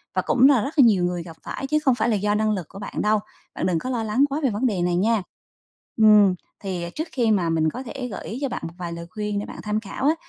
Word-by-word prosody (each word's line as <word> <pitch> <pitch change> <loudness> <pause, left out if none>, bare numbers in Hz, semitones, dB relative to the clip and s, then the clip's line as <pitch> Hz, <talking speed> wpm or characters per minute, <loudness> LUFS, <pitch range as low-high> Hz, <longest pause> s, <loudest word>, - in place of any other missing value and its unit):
và - - +2
cũng 265 +2 +4
là 255 -6 +4
rất 275 - -4
là - - +9
nhiều 195 -6 +4
người 175 -1 -1
gặp 165 -2 -11
phải, 270 - -5
chứ 305 +1 +2
không 260 -2 +4
phải 230 0 0
là 215 - +2
do 205 +1 0
năng 215 0 +1
lực 185 -6 -2
của 195 - -10
bạn 205 - -4
đâu. 210 0 +2 0.4
Bạn - - -2
đừng 175 -3 +1
có 255 - -5
lo 235 -3 -1
lắng 250 +6 +2
quá 285 +3 -2
về 265 - +3
vấn 215 +5 -1
đề 200 -7 +1
này 175 0 +1
nha. 215 +3 +2 0.8
Ừm, 210 -4 +6 0.2
thì 185 -4 -4
trước 315 +2 -3
khi 235 -4 +1
mà 180 -5 +2
mình 160 -1 +2
có 255 - -6
thể 250 +1 -6
gợi - - -7
ý 235 +5 -5
cho 275 - -1
bạn - - -4
một 165 - -11
vài 170 -1 -4
lời 170 0 -7
khuyên 210 -1 -3
để 205 - -4
bạn - - -9
tham 210 0 -1
khảo 220 +5 -7
á, 310 - +5
210 Hz, 300 wpm, -23 LUFS, 185-250 Hz, 0.8 s, là